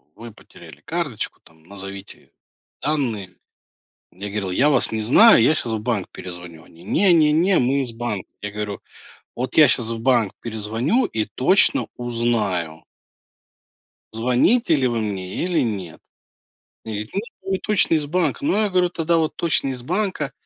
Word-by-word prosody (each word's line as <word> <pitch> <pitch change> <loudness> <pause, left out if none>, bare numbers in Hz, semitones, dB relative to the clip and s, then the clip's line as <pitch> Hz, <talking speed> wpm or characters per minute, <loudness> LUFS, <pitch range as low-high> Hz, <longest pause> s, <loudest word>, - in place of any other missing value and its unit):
вы 115 +2 -10
потеряли 110 - -16
карточку, - - -4
там, 80 0 -20
назовите 95 +2 -9 0.5
данные. 120 -11 -2 0.8
Я 100 +3 -7
говорил: 100 -2 -3
"Я 140 +10 +3
вас 135 -5 +2
не 110 0 -1
знаю, 140 - +7
я 150 +7 +4
сейчас 115 - -2
в 110 - -2
банк 105 -4 -2
перезвоню". 90 -2 -10
Они: 85 - -18
"Не 180 - +3
не 155 -3 +4
не, 175 +4 +3
мы 130 +3 +1
из 130 -3 -3
банка". 115 -4 -5
Я 105 - -4
говорю: 105 -1 -5 0.6
"Вот 125 +1 -4
я 155 - +8
щас 120 -4 +1
в 115 -1 -3
банк 120 -5 +2
перезвоню 115 - -1
и 110 - -2
точно 190 - +3
узнаю". 115 -9 -2 1.3
Звоните 125 - +2
ли 130 -2 +2
вы 120 -2 -1
мне 95 -3 -4
или 175 -2 +1
нет. 95 -8 -4 0.9
Они 110 -2 -5
говорят: 105 - -19 0.3
"Ну 195 - -7
мы 190 - +1
точно 205 -5 +1
из 150 -2 0
банка". 165 - -1
Но 295 - +1
я 210 - +1
говорю: 180 -1 +2
"Тогда 170 -1 0
вот 160 -1 0
точно 165 -4 0
из 130 -2 -5
банка". 180 - -2
120 Hz, 165 wpm, -21 LUFS, 105-155 Hz, 1.3 s, я